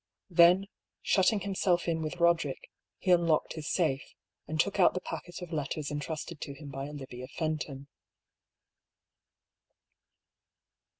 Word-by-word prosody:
Then 175 +3 +6 0.4
shutting 200 +2 +3
himself 185 -3 +1
in 165 -1 0
with 155 +1 -4
Boderick, 170 -5 +1 0.3
he 185 - 0
unlocked 170 -3 +3
his 155 0 -5
safe, 150 -6 +1 0.5
and 155 0 -3
took 200 +3 +1
out 185 - +5
the - - 0
packet 180 0 -7
of 175 -1 -8
letters 150 0 -2
entrusted 150 +2 -5
to 140 - -5
him 140 0 -9
by 135 +1 -4
Olivia 130 -3 -8
Fenton. 145 -3 -3
160 Hz, 125 wpm, -30 LUFS, 145-175 Hz, 0.5 s, Then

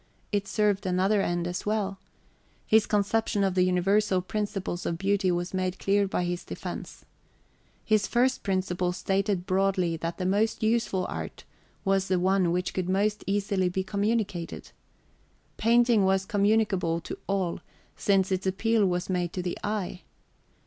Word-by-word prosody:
It 200 -1 0
served 205 -2 +1
another 190 +3 +2
end 175 -2 -1
as 175 0 -3
well. 205 -2 -1 0.7
His 220 0 +4
conception 210 0 +1
of 190 -1 +1
the 185 - +2
universal 185 +2 +2
principles 195 -2 -3
of 170 - -1
beauty 195 0 +1
was 175 +1 -1
made 185 0 -1
clear 200 0 +2
by 180 -2 -1
this 175 0 -3
defence. - - -7 0.8
His 215 -2 +2
first 255 +2 +2
principle 185 -2 -1
stated 195 0 -1
broadly 185 -3 +1
that 165 +1 -4
the 180 - -3
most 210 +4 +1
useful 220 -4 +1
art - - -6 0.4
was 195 0 +2
the 185 - +2
one 185 -1 +2
which 180 +1 -1
could 185 -1 -2
most 205 +3 +1
easily 195 -2 +1
be 190 +1 -2
communicated. 200 -3 -2
{xvii} - - -18 0.8
Painting 235 -1 +4
was 190 0 +2
communicable 205 -5 +1
to - - -7
all 190 -3 -1 0.4
since 195 -1 +2
its 190 0 0
appeal 215 +2 +2
was 180 0 -1
made 180 -2 -1
to 180 - -3
the 175 - -2
eye. 200 -3 -3
195 Hz, 155 wpm, -27 LUFS, 180-205 Hz, 0.8 s, His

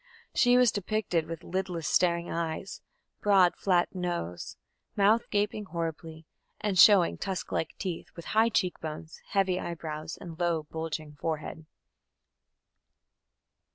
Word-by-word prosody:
She 245 0 +5
was 250 -3 +5
depicted 200 -5 -1
with 165 -1 -6
lidless 180 -4 -3
staring 170 -1 +2
eyes, 165 +3 -4 0.4
broad 195 -4 +5
flat 180 -2 +1
nose, 175 - -4 0.4
mouth 210 +3 +3
gaping 210 0 0
horribly, 160 -2 -5 0.3
and 200 -4 0
showing 195 -4 +7
tusk 190 -2 -4
like 160 - -2
teeth, 180 -4 -4
and - - -28
with 170 - -9
high 220 +2 +5
cheek 185 -5 0
bones, 155 0 -7
heavy 190 -2 +1
eyebrows, 160 -2 -5
and 165 -2 -9
low 170 -3 +1
bulging 155 -1 -5
forehead. 160 0 -4
175 Hz, 125 wpm, -29 LUFS, 160-195 Hz, 0.4 s, showing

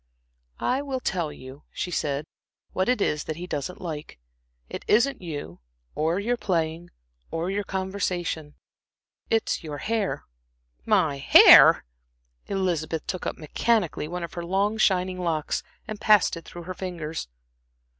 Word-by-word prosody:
"I 260 +2 0
will 270 -2 -3
tell 175 -10 -2
you," 130 +1 -12
she 180 - -4
said, 145 -3 -1 0.5
"what 185 +5 0
it 250 -4 +2
is 150 -4 0
that 155 - -4
he 175 +3 -6
doesn't 175 +1 -4
like. 155 - -6 0.5
It - - -7
isn't 240 +4 +3
you, 145 - -6 0.3
or 165 +4 0
your 240 +4 0
playing, 170 -4 -1 0.4
or 165 +3 -2
your 205 +1 -1
conversation; 185 -5 -3 0.7
it's 225 -5 0
your 150 -2 -5
hair." 215 +2 -2 0.6
"My 145 -3 +3
hair!" 135 - +8 0.6
Elizabeth 170 -5 -1
took 185 - -4
up - - -3
mechanically 175 +1 0
one 175 +2 -5
of 170 - -6
her 175 - -5
long 200 +5 0
shining 185 -2 +2
locks 160 -4 -1 0.3
and 215 -2 -6
passed 210 -4 +5
it 165 - -9
through 175 - -9
her 185 +2 -6
fingers. 170 - -5
175 Hz, 145 wpm, -25 LUFS, 155-195 Hz, 0.7 s, hair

